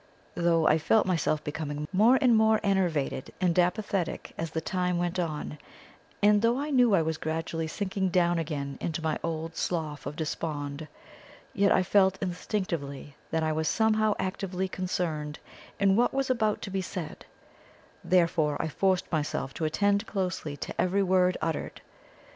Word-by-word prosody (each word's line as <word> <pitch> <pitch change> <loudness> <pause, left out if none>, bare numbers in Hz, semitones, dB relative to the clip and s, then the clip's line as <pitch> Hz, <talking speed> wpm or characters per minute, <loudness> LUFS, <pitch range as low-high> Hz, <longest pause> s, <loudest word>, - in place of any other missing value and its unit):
Though 170 -2 +2
I 155 - +4
felt 220 +8 +3
myself 165 -4 0
becoming 150 0 -4
more 225 +7 +5
and 245 -3 +5
more 220 0 +4
enervated 175 -10 0
and 180 -1 +2
apathetic 180 0 -1
as 165 - -3
the 160 - -2
time 180 +1 -1
went 175 +1 -1
on, 155 -3 -3 0.6
and 205 0 +5
though 230 +2 +3
I 295 +2 -3
knew 245 -6 +5
I 165 - +3
was 160 0 -2
gradually 160 0 -2
sinking 190 +2 -2
down 175 -1 +2
again 140 -4 -4
into 160 -1 -3
my 160 -1 -1
old 165 0 -3
Slough 155 -6 -3
of 145 - -5
Despond, 155 -2 -4 0.7
yet 200 0 +3
I 185 - +4
felt 190 0 +3
instinctively 170 -7 -4
that 160 0 0
I 155 - +1
was 155 0 -1
somehow 215 +3 +2
actively 190 0 -2
concerned 170 -5 -3 0.4
in 195 -1 +4
what 245 +4 +2
was 270 -1 +1
about 220 -4 0
to 195 - -5
be 195 0 -1
said, 180 -3 -6 0.8
therefore 165 -5 +2
I 160 - -1
forced 190 +3 0
myself 145 -4 -2
to 160 - -3
attend 200 +6 +1
closely 180 -7 -3
to - - -3
every 195 +2 +2
word 185 -1 +3
uttered. 165 -1 -3
175 Hz, 160 wpm, -28 LUFS, 155-195 Hz, 0.8 s, more